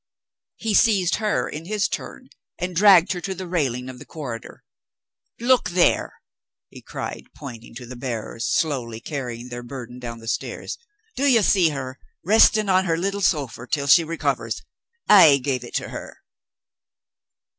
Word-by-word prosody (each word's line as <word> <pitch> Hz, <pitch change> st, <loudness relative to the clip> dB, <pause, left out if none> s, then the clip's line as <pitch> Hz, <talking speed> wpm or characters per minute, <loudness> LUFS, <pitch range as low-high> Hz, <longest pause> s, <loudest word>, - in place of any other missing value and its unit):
He 225 Hz, -2 st, -2 dB
seized 200 Hz, -5 st, +3 dB
her 215 Hz, -1 st, 0 dB
in 155 Hz, +2 st, -7 dB
his 210 Hz, +2 st, 0 dB
turn -, -, -7 dB, 0.3 s
and 180 Hz, 0 st, -4 dB
dragged 190 Hz, -2 st, +6 dB
her 180 Hz, -2 st, -3 dB
to 190 Hz, +2 st, -4 dB
the 185 Hz, +1 st, -6 dB
railing 135 Hz, -8 st, -1 dB
of 130 Hz, -1 st, -9 dB
the -, -, -11 dB
corridor. 125 Hz, -8 st, -8 dB, 0.8 s
"Look 240 Hz, -5 st, +3 dB
there!" 180 Hz, 0 st, +1 dB, 0.5 s
he -, -, -13 dB
cried, -, -, -7 dB
pointing 115 Hz, -3 st, -10 dB
to 125 Hz, -, -8 dB
the 125 Hz, +2 st, -9 dB
bearers, 115 Hz, -2 st, -4 dB
slowly 125 Hz, -8 st, -1 dB
carrying 125 Hz, -3 st, -6 dB
their 120 Hz, 0 st, -6 dB
burden 125 Hz, -1 st, -9 dB
down 120 Hz, -2 st, -6 dB
the 115 Hz, 0 st, -12 dB
stairs. -, -, -4 dB, 0.4 s
"Do 280 Hz, -, +1 dB
you 235 Hz, -6 st, +5 dB
see 180 Hz, -4 st, +4 dB
her, 135 Hz, -3 st, -6 dB, 0.3 s
resting 215 Hz, +1 st, +5 dB
on 190 Hz, 0 st, +3 dB
her 165 Hz, -2 st, +1 dB
little 195 Hz, +3 st, -2 dB
sofa 140 Hz, -9 st, -1 dB
till 140 Hz, +2 st, -1 dB
she 145 Hz, +5 st, +6 dB
recovers? 165 Hz, +1 st, -2 dB, 0.4 s
I 165 Hz, -9 st, +8 dB
gave 130 Hz, -2 st, -2 dB
it -, -, -9 dB
to -, -, -2 dB
her!" -, -, -8 dB
155 Hz, 160 wpm, -23 LUFS, 125-190 Hz, 0.8 s, I